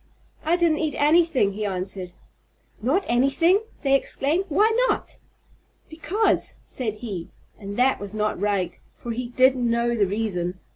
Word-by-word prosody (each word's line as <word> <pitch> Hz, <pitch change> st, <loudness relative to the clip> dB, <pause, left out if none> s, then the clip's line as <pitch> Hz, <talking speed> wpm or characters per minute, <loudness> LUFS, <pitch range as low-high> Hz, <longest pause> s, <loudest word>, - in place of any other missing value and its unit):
"I 325 Hz, +3 st, +2 dB
didn't 335 Hz, -3 st, +2 dB
eat 310 Hz, -4 st, -1 dB
anything," 300 Hz, -, +3 dB
he 210 Hz, +2 st, -4 dB
answered. 185 Hz, -2 st, -4 dB, 0.7 s
"Not 300 Hz, -, +1 dB
anything!" 275 Hz, -, +3 dB, 0.2 s
they 275 Hz, -1 st, +2 dB
exclaimed. 290 Hz, +6 st, +1 dB
"Why 415 Hz, +9 st, +3 dB, 0.2 s
not?" -, -, -3 dB, 0.7 s
"Because!" 365 Hz, +7 st, 0 dB
said 225 Hz, -5 st, -4 dB
he. 205 Hz, -7 st, -6 dB, 0.3 s
And 200 Hz, -1 st, -7 dB
that 260 Hz, +2 st, +3 dB
was 200 Hz, -1 st, -7 dB
not 215 Hz, -2 st, -1 dB
right, 200 Hz, -4 st, -1 dB, 0.2 s
for 235 Hz, -, -6 dB
he 240 Hz, +1 st, -4 dB
did 255 Hz, +2 st, +4 dB
know 235 Hz, -1 st, +1 dB
the 210 Hz, -4 st, +2 dB
reason. 185 Hz, -3 st, -2 dB
240 Hz, 145 wpm, -24 LUFS, 205-305 Hz, 0.7 s, did